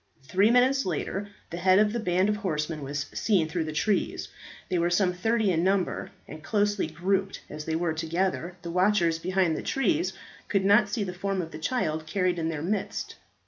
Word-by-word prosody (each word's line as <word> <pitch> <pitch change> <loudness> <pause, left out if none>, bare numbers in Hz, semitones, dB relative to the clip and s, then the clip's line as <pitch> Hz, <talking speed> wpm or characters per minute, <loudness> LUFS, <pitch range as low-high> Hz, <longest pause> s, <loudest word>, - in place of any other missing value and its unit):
Three 190 +10 +3
minutes 255 +3 +4
later 190 +4 -3 0.2
the 170 - -4
head 185 +1 +5
of 210 +1 +3
a 235 - -1
band 185 -2 +2
of 210 0 +1
horsemen 155 -6 -2
was 145 +1 -3
seen 190 -8 +2
through 160 0 -2
the 155 - -4
trees. 195 +7 0 0.4
They 180 -2 0
were 170 +1 +2
some 180 +1 +2
thirty 220 +2 +1
in 165 -1 +1
number, 190 -1 0 0.2
and, 155 - -9
closely 205 0 +1
grouped 195 +2 -1
as 150 0 -6
they 160 - -1
were 165 -1 0
together, 170 +2 -1
the 170 - -5
watchers 180 -3 +2
behind 185 -1 +1
the - - -3
trees 315 +5 0 0.3
could 195 -2 +1
not 205 +1 +5
see 210 +1 -1
the 185 -2 -4
form 195 +1 -2
of 165 -2 -4
the 155 - -8
child 155 -6 -1
carried 180 0 0
in 160 0 -1
their 155 -2 -3
midst. 200 +4 -2
185 Hz, 200 wpm, -27 LUFS, 165-205 Hz, 0.4 s, head